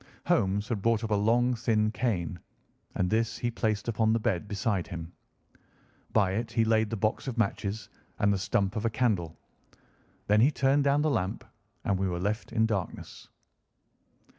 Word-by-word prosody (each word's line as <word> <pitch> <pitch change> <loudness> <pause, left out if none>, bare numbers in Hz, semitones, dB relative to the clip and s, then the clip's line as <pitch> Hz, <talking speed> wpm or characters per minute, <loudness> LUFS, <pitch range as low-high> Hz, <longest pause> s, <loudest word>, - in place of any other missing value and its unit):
Holmes 100 +2 +1
had 110 -5 -1
brought 115 +1 +2
up 110 - -3
a - - +4
long 115 +5 +3
thin 110 -2 +1
cane, 90 -8 -2 0.6
and 90 - +1
this 115 +1 +1
he 120 - -1
placed 110 -2 -1
upon 110 -1 +2
the 115 - +2
bed 95 -3 -1
beside 100 -2 -1
him. 85 -2 -7 1.0
By 100 -4 +3
it 115 +4 -2
he 115 -1 +3
laid 110 -1 +2
the 115 - -2
box 110 +6 -1
of 125 -2 -4
matches 105 -1 -1 0.3
and 100 0 +3
the 100 - -1
stump 100 0 0
of 110 - -2
a - - +3
candle. 105 -9 0 0.9
Then 105 +1 +4
he 130 - +6
turned 140 -1 +2
down 140 +1 +3
the 155 - +2
lamp, 105 -1 -1 0.4
and 95 -2 +1
we 95 - +1
were 90 -1 -2
left 105 +5 -2
in 110 -1 +2
darkness. 100 -5 -4
110 Hz, 180 wpm, -29 LUFS, 100-115 Hz, 1.0 s, he